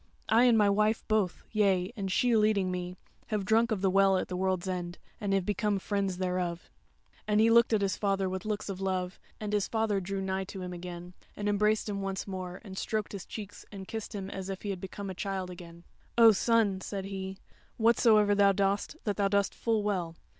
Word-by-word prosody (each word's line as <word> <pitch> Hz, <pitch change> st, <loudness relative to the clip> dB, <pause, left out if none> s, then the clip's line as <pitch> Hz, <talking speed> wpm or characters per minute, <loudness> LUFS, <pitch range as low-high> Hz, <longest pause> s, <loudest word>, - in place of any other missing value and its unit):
I 230 Hz, +3 st, +5 dB
and 240 Hz, -2 st, +5 dB
my 210 Hz, -1 st, +5 dB
wife 210 Hz, +2 st, +1 dB
both, 215 Hz, -5 st, 0 dB
yea 195 Hz, -2 st, +2 dB
and 195 Hz, -4 st, -3 dB
she 245 Hz, +4 st, +3 dB
leading 210 Hz, -4 st, +2 dB
me, 180 Hz, 0 st, -4 dB, 0.3 s
have 210 Hz, -3 st, -2 dB
drunk 225 Hz, +3 st, +3 dB
of 210 Hz, -4 st, 0 dB
the 195 Hz, -, +3 dB
Well 195 Hz, 0 st, +4 dB
at -, -, -3 dB
the 180 Hz, -, -3 dB
World's 185 Hz, 0 st, -1 dB
End, 175 Hz, -1 st, -3 dB, 0.2 s
and 200 Hz, -1 st, -2 dB
have 195 Hz, -2 st, +1 dB
become 210 Hz, 0 st, 0 dB
Friends 195 Hz, -1 st, -1 dB
thereof." 180 Hz, -2 st, -2 dB, 0.6 s
And 210 Hz, 0 st, +3 dB
he 225 Hz, +1 st, +5 dB
looked 235 Hz, 0 st, +5 dB
at 215 Hz, -2 st, +2 dB
his 190 Hz, -3 st, 0 dB
father 195 Hz, -2 st, 0 dB
with 185 Hz, 0 st, -4 dB
looks 215 Hz, -1 st, -3 dB
of 195 Hz, -1 st, -5 dB
love, 185 Hz, -1 st, -2 dB, 0.2 s
and 210 Hz, -1 st, -4 dB
his 205 Hz, -2 st, +1 dB
father 220 Hz, -3 st, 0 dB
drew 195 Hz, +2 st, -3 dB
nigh 190 Hz, 0 st, -2 dB
to 190 Hz, 0 st, -7 dB
him 180 Hz, 0 st, -5 dB
again, 175 Hz, 0 st, -8 dB, 0.2 s
and 205 Hz, -, -2 dB
embraced 210 Hz, +1 st, +2 dB
him 200 Hz, -1 st, -3 dB
once 195 Hz, -1 st, -3 dB
more, 185 Hz, -2 st, -6 dB
and 190 Hz, -3 st, -7 dB
stroked 215 Hz, -1 st, -2 dB
his 200 Hz, -2 st, -7 dB
cheeks 205 Hz, -2 st, -8 dB
and 195 Hz, -2 st, -8 dB
kissed 220 Hz, 0 st, -6 dB
him 195 Hz, -1 st, -5 dB
as 190 Hz, 0 st, -5 dB
if 195 Hz, -1 st, -5 dB
he 205 Hz, -, -2 dB
had 185 Hz, -2 st, -5 dB
become 195 Hz, +1 st, -6 dB
a -, -, -5 dB
child 190 Hz, -1 st, -3 dB
again: 170 Hz, -1 st, -11 dB, 0.3 s
"O 230 Hz, -1 st, +9 dB
son," 210 Hz, -2 st, +2 dB
said 195 Hz, -1 st, -5 dB
he, 190 Hz, -1 st, -5 dB, 0.4 s
"whatsoever 220 Hz, -2 st, +4 dB
thou 200 Hz, -1 st, +5 dB
dost, 200 Hz, +8 st, 0 dB
that 205 Hz, -2 st, -1 dB
thou 200 Hz, -1 st, +2 dB
dost 200 Hz, 0 st, +1 dB
full 225 Hz, -2 st, 0 dB
well. 180 Hz, -5 st, -2 dB
195 Hz, 220 wpm, -30 LUFS, 185-210 Hz, 0.6 s, O